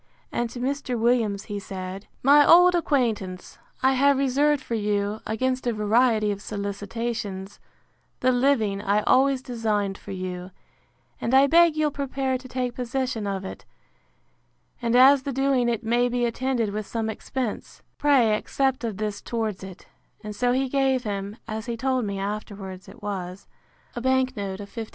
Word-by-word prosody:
And 240 -1 -1
to 245 - -8
Mr. 265 -1 -2
Williams 225 -4 +1
he 205 -1 -5
said, 190 0 -7 0.2
My 290 +3 +7
old 355 +3 +7
acquaintance, 230 - -1 0.2
I 265 0 +5
have 280 +1 +4
reserved 275 +1 +2
for - - -5
you, 205 -1 -1
against 255 +3 -1
a 240 - +1
variety 215 0 +2
of 200 0 -5
solicitations, 205 -1 -4 0.6
the 255 - +3
living 245 -6 +2
I 205 +1 +1
always 265 0 +3
designed 215 -5 -1
for - - -13
you; 185 -1 -5 0.7
and 245 - +1
I 270 +1 +7
beg 335 +2 +5
you'll 305 -1 +2
prepare 270 -2 -2
to 255 - -11
take 250 -1 -2
possession 250 -3 -2
of 195 -1 -3
it; - - -8 1.2
and 235 0 +1
as 265 +2 +7
the 275 - -4
doing 265 -2 +1
it 235 0 -2
may 240 +2 +2
be 245 0 0
attended 235 -2 -1
with 210 0 -4
some 225 -1 -2
expense, 225 +1 -5 0.2
pray 270 -7 +4
accept 265 +3 -1
of 220 -4 -3
this 210 -1 -3
towards 220 -5 -3
it; 190 -2 -10 0.4
and 210 0 -6
so 245 +3 +1
he 265 +2 +1
gave 265 -1 +1
him 200 -1 -4
(as 220 +1 -5
he 235 -1 -3
told 260 -1 0
me 200 -1 -3
afterwards 195 -2 -6
it 235 - -15
was) 190 -2 -5 0.5
a 240 - -4
bank 260 0 +1
note 195 -1 -4
of 200 - -10
50l. 225 -2 -6
235 Hz, 170 wpm, -25 LUFS, 205-260 Hz, 1.2 s, My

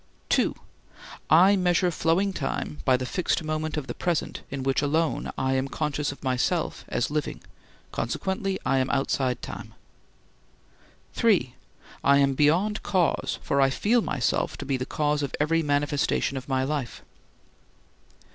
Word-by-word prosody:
(2) - - +2 0.7
I 185 +6 +7
measure 180 -1 +2
flowing 170 +5 +1
time 150 - -3
by 130 -2 +4
the 130 - -4
fixed 175 +3 -1
moment 155 0 -2
of 150 - -3
the 120 - -5
present 170 -3 -2
in 135 -1 -4
which 135 0 +1
alone 155 +2 0
I 130 0 0
am 135 0 0
conscious 150 0 -2
of 140 - -12
myself 130 -2 0
as 120 - -1
living, 150 -1 -2 0.5
consequently 190 - -2
I 135 - +2
am 130 - 0
outside 135 -2 0
time. - - -8 1.4
(3) - - +2 0.5
I 140 0 +5
am 140 -1 +3
beyond 175 +10 +2
cause, 180 -4 0
for 140 - +1
I 135 - +5
feel 230 - +2
myself 140 - -1
to - - -6
be 135 0 0
the 130 0 -3
cause 150 -1 0
of 140 - -3
every 165 +3 +2
manifestation 145 -2 0
of 130 +1 -6
my 130 -1 +1
life. 140 -3 -3
145 Hz, 150 wpm, -26 LUFS, 135-165 Hz, 1.4 s, I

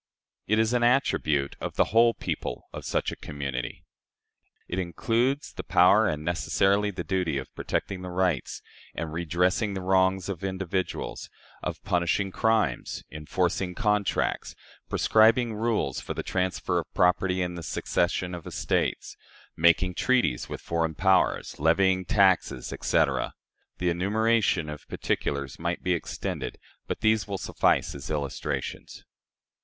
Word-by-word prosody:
It 110 - +2
is 110 +1 +2
an 120 - +2
attribute 80 - +2
of - - -4
the - - +4
whole 115 +1 +5
people - - -4
of - - -7
such - - 0
a - - -6
community. 70 -4 -5 0.8
It 90 - -3
includes 115 - 0
the - - -5
power 100 +5 +5
and 75 -4 -2
necessarily 95 +4 +2
the 90 -3 -5
duty 90 -6 -1
of 65 - -6
protecting 95 -2 -3
the 90 - -6
rights 90 -5 -1 0.3
and 80 -1 -4
redressing 90 +5 0
the 95 - -3
wrongs 95 0 +2
of 95 -2 -5
individuals, 95 -1 -3 0.3
of - - -5
punishing 90 +3 +1
crimes, 110 - 0
enforcing 90 +4 -1
contracts, 105 -4 0 0.3
prescribing 115 +2 +4
rules 110 - -1
for - - -5
the - - -3
transfer 90 0 -1
of - - -7
property 90 +1 +2
and 90 0 -4
the 85 - -6
succession 90 +2 -1
of 85 -2 -7
estates, - - -1 0.4
making 85 +2 +4
treaties 125 - +1
with - - -6
foreign 80 -1 -1
powers, 95 +3 +2
levying 95 +4 +3
taxes, 95 -10 +2
etc. - - +1 0.4
The 90 -1 +1
enumeration 105 -1 +1
of 75 0 -8
particulars 70 -1 -2
might 85 +1 -2
be 90 - +2
extended, 85 - -4 0.3
but - - -4
these 110 -1 +2
will 100 -1 -3
suffice - - +1
as 70 - -8
illustrations. 70 -3 -4
90 Hz, 140 wpm, -27 LUFS, 85-105 Hz, 0.8 s, whole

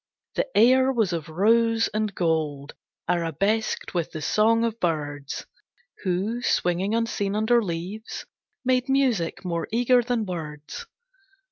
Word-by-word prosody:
The - - 0
air 260 +4 +6
was 220 -8 +1
of 165 -2 -4
rose 230 +6 +3
and 215 -2 -2
gold 155 -4 -1 0.3
Arabesqued 180 +6 0
with 170 -3 -1
the 155 - -5
song 225 +7 +3
of 230 -1 -1
birds 145 -4 -2 0.6
Who, 195 +6 -1
swinging 190 -2 +1
unseen 210 -3 -1
under 225 +2 +3
leaves, 185 +5 -5 0.4
Made 255 +1 +2
music 245 -12 +1
more 170 -2 -2
eager 245 +2 +4
than 240 -2 -1
words. 160 - -6
205 Hz, 125 wpm, -25 LUFS, 170-230 Hz, 0.6 s, air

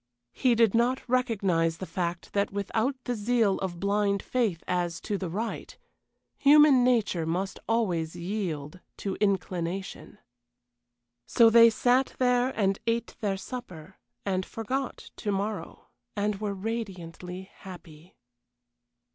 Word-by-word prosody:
He 250 -2 +2
did 225 -3 +4
not 240 +3 +1
recognize 195 -10 +1
the 190 - -5
fact 175 -2 -4
that 200 0 +1
without 220 +6 -1
the 245 - -2
zeal 220 -2 +1
of 175 -3 -4
blind 200 0 +1
faith 220 -10 -1
as 175 -1 -1
to 205 - -2
the 190 -3 -3
right, 220 +7 -4 0.6
human 285 -2 +7
nature 220 -10 +1
must 185 +4 -2
always 175 -8 0
yield 175 -4 -4 0.2
to 195 - -3
inclination. 190 -1 -2 1.1
So 230 -1 +5
they 230 0 +8
sat 250 +3 +2
there 250 0 +3
and 195 -1 +2
ate 230 +1 -1
their 200 -4 -1
supper, 190 -7 -9 0.3
and 190 -2 0
forgot 255 +7 -4
to 210 - -2
morrow, 200 +2 -4 0.3
and 205 0 -1
were 205 -2 -2
radiantly 190 -3 -6
happy. 170 -2 -13
200 Hz, 125 wpm, -28 LUFS, 180-230 Hz, 1.1 s, they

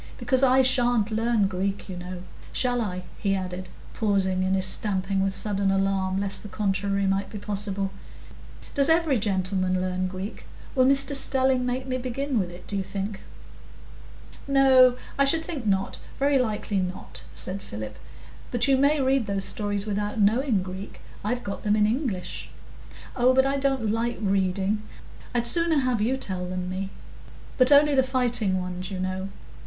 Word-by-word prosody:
Because 260 -1 +2
I 265 0 +5
sha'n't 245 -4 +2
learn 225 -1 +2
Greek, 195 +1 -3
you 185 - -6
know. 180 0 -7 0.3
Shall 245 -1 0
I?" 185 -4 -3 0.2
he 195 -1 +1
added, 185 -1 -5 0.2
pausing 195 -3 +1
in 190 +1 +1
his 190 0 +1
stamping 195 0 +1
with 195 0 +1
a - - -1
sudden 200 -2 0
alarm, 195 -1 +1
lest 195 -1 0
the 210 - -9
contrary 200 -1 0
might 195 +1 0
be 210 - -7
possible. 200 -1 -1 0.8
"Does 280 +1 +4
every 320 -6 +3
gentleman 185 -2 0
learn 185 0 -1
Greek? 190 +3 -7 0.3
Will 255 -2 +4
Mr 275 +1 +3
Stelling 265 -2 +1
make 255 +1 -2
me 255 -1 -2
begin 260 +1 -2
with 185 -3 -1
it, 175 +1 -12
do 205 - -6
you 195 - 0
think?" 195 +1 -4 1.3
"No, 260 -2 +6 0.2
I - - +6
should 320 +4 +3
think 275 -10 -5
not, 195 -1 0 0.2
very 280 0 +3
likely 215 -4 -1
not," 185 -1 -4
said 195 +2 -3
Philip. 105 - -7 0.5
"But 240 +2 +1
you 270 -1 +4
may 285 +3 +3
read 265 -3 +2
those 195 -1 0
stories 205 0 -2
without 210 +1 -2
knowing 215 0 +2
Greek. 190 +2 -8 0.2
I've 245 +4 -2
got 200 - -5
them 210 0 +2
in 210 -1 +3
English." 220 - -2 0.7
"Oh, 255 +1 +4
but 265 0 +5
I 275 +1 +1
don't 270 -6 0
like 235 +2 -1
reading; 195 0 0 0.5
I'd 240 -1 +1
sooner 335 +4 +4
have 250 -4 0
you 250 +5 +1
tell 185 -7 -3
them 180 0 -4
me. 190 +1 -3 0.7
But 255 +2 +5
only 290 +1 +6
the 265 - +5
fighting 245 -7 +1
ones, 180 0 -5
you 190 -2 -5
know. 185 +1 -3
205 Hz, 170 wpm, -25 LUFS, 190-255 Hz, 1.3 s, No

